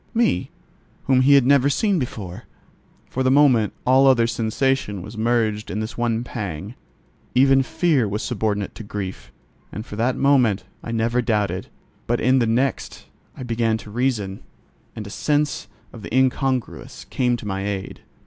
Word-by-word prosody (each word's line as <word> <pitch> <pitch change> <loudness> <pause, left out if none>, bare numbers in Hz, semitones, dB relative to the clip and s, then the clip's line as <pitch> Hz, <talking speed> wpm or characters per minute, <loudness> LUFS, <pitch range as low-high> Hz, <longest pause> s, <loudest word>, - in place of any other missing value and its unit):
—me, 225 - +1 0.5
whom 130 -1 +3
he 140 +2 +6
had 135 -3 +5
never 140 0 +4
seen 190 +6 +1
before? 110 -5 -6 0.6
For 130 - -3
the 130 - +3
moment 130 -6 +4
all 130 +2 +5
other 125 -3 +5
sensation 115 -2 -1
was 105 +3 -9
merged 110 -2 0
in 100 +5 -3
this 110 +1 -4
one 120 -1 -1
pang: 100 -4 -6 0.6
even 135 +1 +5
fear 140 -3 +1
was 105 +2 -3
subordinate 105 -4 -2
to 110 - -9
grief, 95 - -6 0.4
and 105 +4 -6
for 105 - -8
that 125 +3 +1
moment 125 -8 +3 0.2
I 115 - -5
never 115 +2 +1
doubted; 105 -4 -1 0.4
but 120 +1 +1
in 130 +2 +3
the 120 - +1
next 125 +3 -1 0.3
I - - -6
began 115 -2 0
to 105 - -12
reason, 110 -5 -1 0.5
and 105 - -6
a 100 - -8
sense 150 -5 -1 0.3
of 115 - -10
the - - -9
incongruous 130 -1 -1
came 125 -2 +1
to 115 - -10
my 95 -1 -3
aid. 95 -2 -5
115 Hz, 165 wpm, -22 LUFS, 105-130 Hz, 0.6 s, he